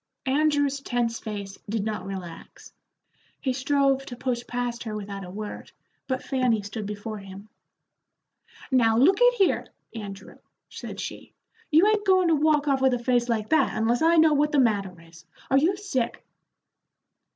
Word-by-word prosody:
Andrew's 285 Hz, 0 st, +2 dB
tense 240 Hz, -3 st, -1 dB
face 200 Hz, -3 st, -7 dB
did 215 Hz, -1 st, -1 dB
not 210 Hz, -4 st, -4 dB
relax; 185 Hz, -4 st, -9 dB, 0.7 s
he 260 Hz, -3 st, -1 dB
strove 275 Hz, 0 st, +1 dB
to 245 Hz, -, -7 dB
push 245 Hz, -1 st, -2 dB
past 245 Hz, -1 st, -3 dB
her 220 Hz, -2 st, -5 dB
without 200 Hz, -1 st, -6 dB
a 180 Hz, -, -9 dB
word, 210 Hz, +3 st, -7 dB, 0.4 s
but 260 Hz, -1 st, -2 dB
Fanny 250 Hz, -6 st, +1 dB
stood 205 Hz, +1 st, -6 dB
before 210 Hz, +1 st, -6 dB
him. 195 Hz, +2 st, -11 dB, 1.2 s
"Now, 225 Hz, -4 st, +4 dB
look 370 Hz, -, +4 dB
at -, -, +6 dB
here, 390 Hz, -5 st, +1 dB, 0.3 s
Andrew," 200 Hz, -3 st, -9 dB, 0.3 s
said -, -, -8 dB
she, -, -, -7 dB, 0.3 s
"you 320 Hz, +5 st, +5 dB
'ain't 425 Hz, 0 st, +2 dB
goin' 370 Hz, -2 st, +4 dB
to 325 Hz, -, +4 dB
walk 300 Hz, 0 st, +2 dB
off 270 Hz, -2 st, +2 dB
with 265 Hz, -1 st, +4 dB
a -, -, -1 dB
face 245 Hz, 0 st, +1 dB
like 220 Hz, -2 st, -1 dB
that, 315 Hz, -, +2 dB
unless 230 Hz, +2 st, +1 dB
I 330 Hz, +1 st, +4 dB
know 315 Hz, -1 st, +6 dB
what 295 Hz, +1 st, +2 dB
the 290 Hz, -, +3 dB
matter 200 Hz, -8 st, +1 dB
is. 165 Hz, -1 st, -16 dB, 0.3 s
Are 270 Hz, -, +5 dB
you 355 Hz, +7 st, +2 dB
sick?" 260 Hz, -, -3 dB
245 Hz, 165 wpm, -25 LUFS, 210-285 Hz, 1.2 s, at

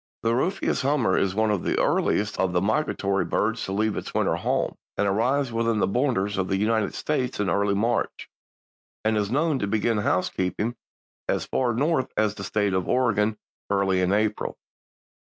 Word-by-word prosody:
The 115 Hz, 0 st, +2 dB
Rufous 180 Hz, +11 st, 0 dB
Hummer 130 Hz, -8 st, +2 dB
is 95 Hz, -1 st, +1 dB
one 110 Hz, 0 st, +2 dB
of 100 Hz, -4 st, 0 dB
the -, -, 0 dB
earliest 105 Hz, +1 st, +1 dB
of 95 Hz, -1 st, +1 dB
the 90 Hz, -, +3 dB
migratory 100 Hz, -3 st, 0 dB
birds 110 Hz, +2 st, -1 dB
to -, -, -5 dB
leave 105 Hz, +1 st, 0 dB
its -, -, -6 dB
winter -, -, +2 dB
home, -, -, -1 dB, 0.2 s
and 105 Hz, -, +2 dB
arrives 125 Hz, +7 st, +1 dB
within 115 Hz, -1 st, +1 dB
the -, -, +3 dB
borders 105 Hz, -4 st, 0 dB
of 95 Hz, -, 0 dB
the 95 Hz, -, 0 dB
United 110 Hz, +1 st, 0 dB
States 130 Hz, -6 st, -2 dB
early 100 Hz, +1 st, +1 dB
in -, -, 0 dB
March 115 Hz, +2 st, -1 dB, 0.8 s
and 110 Hz, 0 st, +2 dB
is 105 Hz, -2 st, 0 dB
known 145 Hz, +3 st, +1 dB
to 100 Hz, -, -1 dB
begin 110 Hz, +1 st, +1 dB
housekeeping 95 Hz, +4 st, -1 dB, 0.5 s
as -, -, 0 dB
far 120 Hz, -3 st, 0 dB
North 140 Hz, 0 st, +1 dB
as 105 Hz, -1 st, +2 dB
the 100 Hz, -, -8 dB
State 105 Hz, 0 st, 0 dB
of 95 Hz, -1 st, 0 dB
Oregon 110 Hz, -4 st, +2 dB, 0.3 s
early 95 Hz, -2 st, +2 dB
in 90 Hz, 0 st, +1 dB
April. 105 Hz, +1 st, 0 dB
105 Hz, 180 wpm, -25 LUFS, 100-120 Hz, 0.8 s, the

